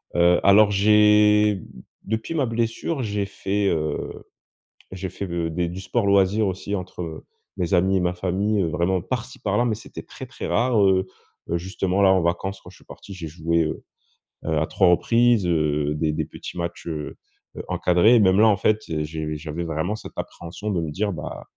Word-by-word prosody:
heu, 90 Hz, 0 st, +4 dB
alors 100 Hz, +1 st, +6 dB
j'ai 105 Hz, 0 st, +4 dB, 0.4 s
depuis 110 Hz, +8 st, -3 dB
ma 145 Hz, -4 st, +1 dB
blessure, 115 Hz, +5 st, -2 dB
j'ai 105 Hz, -2 st, -2 dB
fait, 100 Hz, 0 st, -2 dB
heu, 80 Hz, -2 st, -3 dB, 0.7 s
j'ai 95 Hz, 0 st, -5 dB
fait 100 Hz, -, -5 dB
de 85 Hz, -1 st, -2 dB
des 85 Hz, +1 st, -2 dB
du 90 Hz, +2 st, -6 dB
sport 110 Hz, +4 st, -1 dB
loisir 100 Hz, +2 st, +3 dB
aussi 95 Hz, +2 st, -4 dB
entre 90 Hz, -3 st, -7 dB, 0.3 s
mes 85 Hz, -2 st, -2 dB
amis 95 Hz, +2 st, +3 dB
et -, -, 0 dB
ma 90 Hz, 0 st, 0 dB
famille, 95 Hz, +4 st, 0 dB
heu, -, -, 0 dB
vraiment 85 Hz, +4 st, 0 dB
par-ci 125 Hz, +4 st, -5 dB
par-là, 105 Hz, +3 st, +1 dB
mais 115 Hz, -, +1 dB
c'était -, -, -10 dB
très, -, -, -10 dB
très -, -, -7 dB
rare. 120 Hz, -2 st, +2 dB
Heu, 95 Hz, -1 st, +3 dB, 0.4 s
heu 85 Hz, -, +1 dB
justement 95 Hz, +1 st, -1 dB
là 95 Hz, -, +6 dB
en 95 Hz, -, +3 dB
vacances, 95 Hz, +3 st, -2 dB
quand -, -, -12 dB
je -, -, -17 dB
suis -, -, -22 dB
parti, 100 Hz, -, -11 dB
j'ai 85 Hz, -4 st, -6 dB
joué, 85 Hz, +1 st, 0 dB
heu, 75 Hz, -, -5 dB, 0.6 s
heu, 80 Hz, -1 st, 0 dB
à 80 Hz, -, +1 dB
3 95 Hz, -3 st, +3 dB
reprises, 115 Hz, +3 st, +3 dB
heu, 75 Hz, -3 st, +1 dB
des 75 Hz, 0 st, 0 dB
des 80 Hz, 0 st, -2 dB
petits -, -, -9 dB
matchs, 85 Hz, 0 st, -5 dB
heu, 75 Hz, -2 st, -5 dB, 0.4 s
heu, -, -, -5 dB
encadrés 90 Hz, +7 st, +4 dB
et -, -, +6 dB
même 95 Hz, -1 st, +4 dB
là 110 Hz, -, +6 dB
en 105 Hz, -2 st, +4 dB
fait. 110 Hz, +2 st, +2 dB, 0.2 s
J'ai 75 Hz, 0 st, -4 dB
j'avais 80 Hz, +2 st, -5 dB
vraiment 80 Hz, +5 st, -2 dB
cette 110 Hz, -, -10 dB
appréhension 85 Hz, +5 st, -6 dB
de 90 Hz, -4 st, 0 dB
me 80 Hz, -, -3 dB
dire: 100 Hz, +6 st, -1 dB
«Bah, 75 Hz, -, -7 dB
95 Hz, 200 wpm, -23 LUFS, 85-105 Hz, 0.7 s, alors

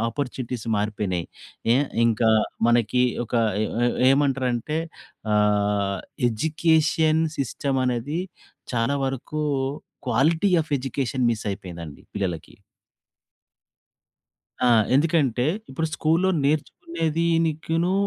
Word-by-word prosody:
Opportunities 125 Hz, -1 st, -4 dB
మారిపోయినాయి. 105 Hz, -4 st, -1 dB, 0.5 s
ఏ -, -, +4 dB, 0.3 s
ఇంకా 115 Hz, 0 st, +3 dB, 0.4 s
మనకి 120 Hz, +1 st, +3 dB, 0.2 s
ఒక 120 Hz, -, -7 dB, 0.3 s
ఎ -, -, +1 dB, 0.2 s
ఎ -, -, +3 dB, 0.2 s
ఏమంటారంటే 135 Hz, 0 st, +1 dB, 0.6 s
ఆహ్, 105 Hz, -1 st, +2 dB, 0.3 s
ఎడ్యుకేషన్ 160 Hz, +4 st, +2 dB, 0.2 s
సిస్టమ్ 135 Hz, 0 st, -1 dB
అనేది, 125 Hz, +7 st, -1 dB, 0.5 s
చాలా 115 Hz, +4 st, +1 dB
వరకు 135 Hz, +3 st, -4 dB, 0.7 s
క్వాలిటీ 160 Hz, -, +2 dB
ఆఫ్ 155 Hz, -, -9 dB
ఎడ్యుకేషన్ 130 Hz, -1 st, -1 dB
మిస్ 110 Hz, -2 st, -3 dB
అయిపోయిందండి 85 Hz, -6 st, -8 dB
పిల్లలకి. 95 Hz, -5 st, -4 dB, 2.1 s
ఆ! -, -, +4 dB, 0.3 s
ఎందుకంటే 140 Hz, -5 st, +2 dB, 0.3 s
ఇప్పుడు 160 Hz, +5 st, -2 dB
స్కూల్‌‌లో 165 Hz, +5 st, +2 dB
నేర్చుకునేదినికిను 165 Hz, +2 st, 0 dB
130 Hz, 85 wpm, -24 LUFS, 110-155 Hz, 2.1 s, ఏ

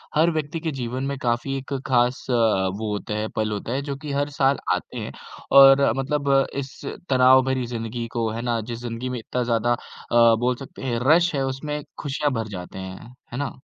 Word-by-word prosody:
हर 160 Hz, +3 st, +5 dB
व्यक्ति 155 Hz, 0 st, -3 dB
के 160 Hz, -1 st, -2 dB
जीवन 130 Hz, 0 st, -4 dB
में 140 Hz, 0 st, -2 dB
काफ़ी 120 Hz, +3 st, -1 dB
एक 135 Hz, +1 st, -6 dB
ख़ास 125 Hz, -1 st, +2 dB
अ, 125 Hz, -, +2 dB
वो 105 Hz, -2 st, +1 dB
होता 105 Hz, +1 st, -3 dB
है, 105 Hz, +1 st, -1 dB
पल 110 Hz, -1 st, 0 dB
होता 105 Hz, +3 st, -4 dB
है, 135 Hz, -, 0 dB
जो 140 Hz, -1 st, -4 dB
कि 150 Hz, 0 st, -6 dB
हर 145 Hz, +1 st, 0 dB
साल 140 Hz, -1 st, +2 dB, 0.2 s
आते -, -, -4 dB
हैं, -, -, -5 dB, 0.4 s
और 135 Hz, -2 st, +8 dB
मतलब 140 Hz, +1 st, -1 dB
अ, 135 Hz, 0 st, +4 dB
इस 130 Hz, -1 st, -7 dB, 0.3 s
तनाव 130 Hz, 0 st, +6 dB
भरी 130 Hz, -1 st, 0 dB
ज़िंदगी 115 Hz, 0 st, -4 dB
को 115 Hz, -1 st, +1 dB
है 115 Hz, +2 st, -4 dB
ना, 120 Hz, -1 st, 0 dB
जिस 115 Hz, +1 st, -6 dB
ज़िंदगी 120 Hz, +1 st, -4 dB
में 125 Hz, -1 st, -3 dB
इतना 125 Hz, +2 st, -2 dB
ज़्यादा 120 Hz, 0 st, +1 dB
अ, 115 Hz, -1 st, +2 dB
बोल 125 Hz, +1 st, +1 dB
सकते 135 Hz, +1 st, -10 dB
है, 120 Hz, -3 st, -1 dB
रश 170 Hz, +1 st, +5 dB
है 135 Hz, -, 0 dB
उसमे 150 Hz, +3 st, -3 dB, 0.2 s
खुशियाँ 145 Hz, 0 st, -1 dB
भर 115 Hz, -2 st, -2 dB
जाते 90 Hz, +1 st, -8 dB
हैं, 95 Hz, +6 st, -9 dB, 0.2 s
है -, -, -3 dB
ना? 140 Hz, -1 st, -3 dB
125 Hz, 215 wpm, -24 LUFS, 115-140 Hz, 0.4 s, और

